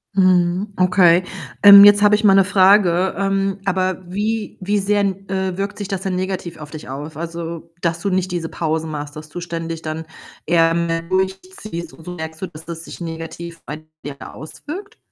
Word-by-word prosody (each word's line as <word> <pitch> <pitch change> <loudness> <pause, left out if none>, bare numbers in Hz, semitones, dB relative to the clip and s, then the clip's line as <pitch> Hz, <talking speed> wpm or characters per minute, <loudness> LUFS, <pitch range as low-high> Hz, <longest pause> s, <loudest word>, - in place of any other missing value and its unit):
Mhm, 185 +1 +2
okay. 180 -1 +4 0.4
Ähm, 200 0 +11
jetzt 205 0 +7
habe 210 0 +6
ich 215 - -2
mal 195 - +6
‘ne 195 0 +6
Frage. 190 -2 +4
Ähm, 195 0 0
aber 185 -1 -1
wie 215 +3 -2
wie 205 +2 0
sehr, 205 +1 +1
äh, 190 -1 -2
wirkt 200 +1 -3
sich 205 -2 -5
das 195 -2 -3
denn 190 -2 -2
negativ 185 -2 -4
auf 150 -1 -10
dich 155 -4 -9
aus? 145 +3 -7
Also, 170 0 -6
dass 170 -1 -1
du 200 +3 -2
nicht 185 -1 -1
diese 170 -2 -3
Pausen 160 -1 -2
machst, 145 -1 -6
dass 155 0 -9
du 175 - -7
ständig 165 -1 -5
dann 160 +1 -5 0.4
eher 165 -1 +3
mehr 165 0 -1
durchziehst 190 - -3
und 160 - -15
so 180 0 -6
merkst 160 -1 -7
so, 190 - -3
dass 160 -2 -13
das 170 0 -7
sich - - -10
negativ 165 0 -7
bei 155 +1 -7 0.2
dir 145 -1 -5 0.2
auswirkt? 365 - -9
180 Hz, 190 wpm, -20 LUFS, 165-195 Hz, 0.4 s, Ähm